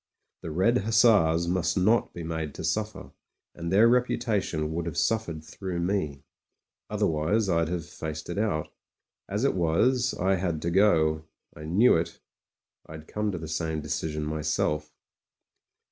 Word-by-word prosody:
The - - -6
Red 95 +10 +2
Hussars 100 -6 +4
must 90 +2 0
not 110 +5 +3
be 85 - -7
made 80 -2 -4
to - - -6
suffer; 110 0 -3 0.4
and 85 0 -5
their 105 +4 +6
reputation 110 -10 0
would 85 +1 -3
have 80 - -5
suf 110 0 +1
fered 80 -2 -7
through 95 -1 -5
me. 85 -6 -2 0.7
Otherwise 80 +8 +1
I'd 85 -3 +2
have 85 -2 -3
faced 80 -2 -6
it 90 +3 -3
out 100 -8 -1 0.6
As 105 +4 -1
it 140 - +3
was, 120 +9 +2
I 95 +1 +1
had 85 -3 -2
to 85 - -1
go; 80 -5 +3 0.3
I 75 - -9
knew 100 +10 +4
it. 80 - -3 0.7
I'd 80 0 -10
come 105 0 -2
to 90 - -4
the 80 -1 -7
same 80 0 -2
decision 75 0 -3
myself. 75 0 -1
85 Hz, 155 wpm, -27 LUFS, 80-105 Hz, 0.7 s, their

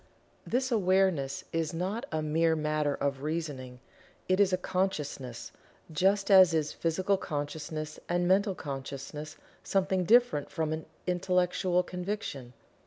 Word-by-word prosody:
This 260 +2 0
awareness 185 - +2
is 165 0 -1
not 190 +7 -3
a 155 -1 -1
mere 160 +2 +2
matter 150 -2 0
of 140 -1 -2
reasoning 145 -5 -4 0.5
it 185 +1 +2
is 200 -2 +4
a 185 - +2
"consciousness," 150 -10 -3 0.4
just 195 +6 +2
as 185 -4 +8
is 150 -2 0
Physical 185 +4 0
Consciousness 155 -1 -4
and 175 0 +1
Mental 195 +1 +3
Consciousness 140 +1 -6 0.3
something 190 -1 +1
different 235 -6 +4
from 160 -1 -1
an 155 0 -5 0.2
"intellectual 180 0 +1
conviction." 180 - -5
165 Hz, 125 wpm, -30 LUFS, 150-190 Hz, 0.5 s, as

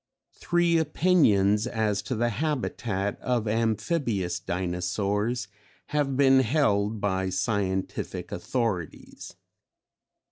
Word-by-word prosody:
Three 175 -1 +2
opinions 125 - +3
as 110 -4 0
to 130 - 0
the 120 +2 +1
habitat 115 -7 -2
of 120 -3 -1
Amphibious 110 - 0
Dinosaurs 100 +6 -2 0.4
have 145 -3 0
been 135 -1 +6
held 110 -6 +1
by 95 -2 0
scientific 95 0 -2
authorities. 110 -10 -4
110 Hz, 85 wpm, -26 LUFS, 100-130 Hz, 0.4 s, been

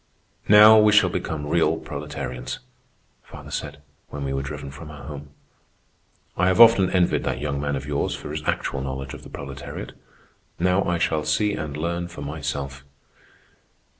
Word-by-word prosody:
"Now 105 +1 +9
we 105 -1 +5
shall 105 -4 +5
become 80 -5 -3
real 80 +1 +2
proletarians," 70 -4 -6 0.6
father - - -12
said, 75 - -5 0.3
when 70 -1 -6
we 70 0 -2
were 70 - -1
driven 70 0 -6
from 75 +3 -10
our 75 -2 -10
home. 75 -1 -8 1.1
"I 90 - +2
have 95 +3 +2
often 115 -5 +8
envied 90 -2 +2
that 65 -1 -1
young 70 -1 -2
man 70 -1 -1
of 70 0 -5
yours 75 0 -1
for 75 - -8
his 75 0 -4
actual 65 - -1
knowledge 65 0 -5
of - - -9
the - - -12
proletariat. 70 -1 -7 0.7
Now 90 +2 +2
I 90 - 0
shall 80 -1 0
see 100 +8 +1
and 75 -4 -4
learn 85 +2 -2
for 85 -4 -9
myself." 70 -1 -5
75 Hz, 165 wpm, -24 LUFS, 70-85 Hz, 1.1 s, Now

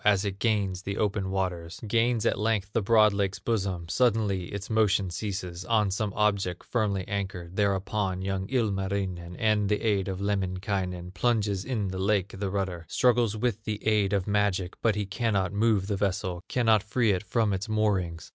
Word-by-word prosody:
As 105 -1 +3
it 100 -1 -3
gains 100 -5 0
the 100 +1 -4
open 100 -2 0
waters, 90 -3 -3
Gains 115 +1 +2
at - - +1
length 105 -2 0
the 115 - +2
broad 105 0 +5
lake's 100 -1 -1
bosom, 95 -7 -2
Suddenly 105 -3 +1
its 100 +2 -6
motion 105 -4 +2
ceases, 90 -2 -4
On 105 -3 +2
some 105 +1 -1
object 100 -4 0
firmly 100 -6 -1
anchored. 95 -3 -4
Thereupon 100 -1 0
young 95 0 -2
Ilmarinen, 95 -6 -1
With 105 -2 +2
the 105 - +1
aid 100 -4 +1
of 95 -1 -3
Lemminkainen, 95 -2 -2
Plunges 105 -1 +1
in 110 -5 -2
the 95 0 -4
lake 100 0 +1
the 100 -1 -1
rudder, 95 -4 -3
Struggles 120 -3 +2
with 110 -1 -1
the 105 -1 -4
aid 105 -3 +2
of 100 -3 +1
magic; 100 -3 0
But 110 -3 +2
he 105 -1 -1
cannot 100 -2 0
move 105 -2 +2
the 100 -1 -2
vessel, 95 -3 -1
Cannot 115 -4 +3
free 110 +1 +1
it 90 -2 0
from 110 -1 0
its 95 +4 -3
moorings. 95 -6 0
100 Hz, 175 wpm, -28 LUFS, 95-110 Hz, -, broad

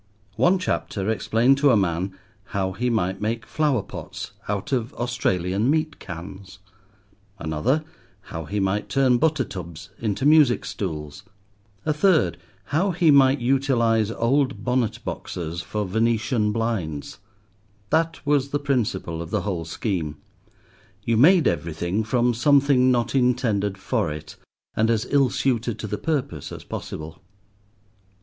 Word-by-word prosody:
One 185 +2 +4
chapter 110 - -2
explained 120 +4 +2
to 145 0 +5
a 120 - +5
man 95 0 -1 0.4
how 95 -1 0
he 120 +6 -1
might 95 -4 -1
make 110 +1 -2
flower 145 -7 0
pots - - -8 0.2
out 100 +2 -3
of 125 -2 -1
Australian 105 -3 0
meat 155 +1 0
cans; 95 +3 -9 0.8
another 80 - 0 0.4
how 80 -4 -7
he 105 +6 -2
might 95 +2 -1
turn 130 -3 +3
butter 155 -2 +2
tubs 85 -6 -8
into 105 +2 -1
music 150 -5 +5
stools; 75 -6 -5 0.6
a 155 - +2
third 160 - +2 0.2
how 160 - 0
he 170 -3 +3
might 135 -1 +5
utilize 120 -4 +2
old 130 +4 0
bonnet 125 -3 0
boxes 85 0 -4
for 105 +3 -3
Venetian 110 +2 +1
blinds: 105 -10 -3 0.7
that 165 +1 0
was 140 -2 +2
the 145 - 0
principle 110 - -1
of 85 - -7
the 105 +1 0
whole 90 -4 -3
scheme, 80 -3 -3 0.9
you 115 - +1
made 160 +6 +6
everything 85 +4 -1
from 120 +2 +1
something 135 0 +4
not 120 -2 0
intended 120 -6 +1
for 85 -4 -1
it, 75 0 -8 0.4
and 110 +1 +1
as 115 -1 +1
ill 140 -3 +4
suited 120 -4 0
to - - -6
the 105 0 -4
purpose 140 - -2
as - - -8
possible. 80 +1 -7
115 Hz, 140 wpm, -24 LUFS, 95-135 Hz, 0.9 s, made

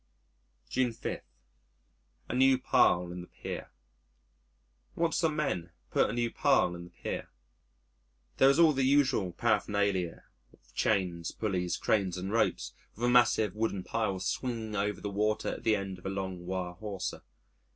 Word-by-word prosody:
June 125 - 0
5. 115 - -4 1.1
A - - -2
New 130 +1 +5
Pile 90 -7 +3
in 90 0 -6
the 90 - -10
Pier - - -7 1.3
Watched 165 0 +1
some 160 -3 +1
men 115 - -1 0.2
put - - +3
a - - -3
new 120 -1 0
pile 135 -11 +3
in 85 0 -8
the - - -13
pier. - - -5 1.1
There 135 - +6
was 140 - +5
all 165 -2 +6
the 135 - 0
usual 130 -8 +3
paraphernalia 100 -4 0 0.3
of - - -25
chains, 90 -5 0
pulleys, 90 -5 -1
cranes, 95 -4 +1
and 95 +2 -4
ropes, 115 - 0 0.2
with 120 - -2
a - - +3
massive 120 -5 +4
wooden 105 -4 -1
pile 110 -3 -1
swinging 110 +2 -3
over 105 0 -1
the 100 - -4
water 105 +2 0
at - - -5
the 110 -1 +3
end 95 -2 -4
of 90 - -7
a - - -1
long 95 -2 -4
wire 90 -1 -3
hawser. 95 0 -5
105 Hz, 160 wpm, -30 LUFS, 90-120 Hz, 1.3 s, There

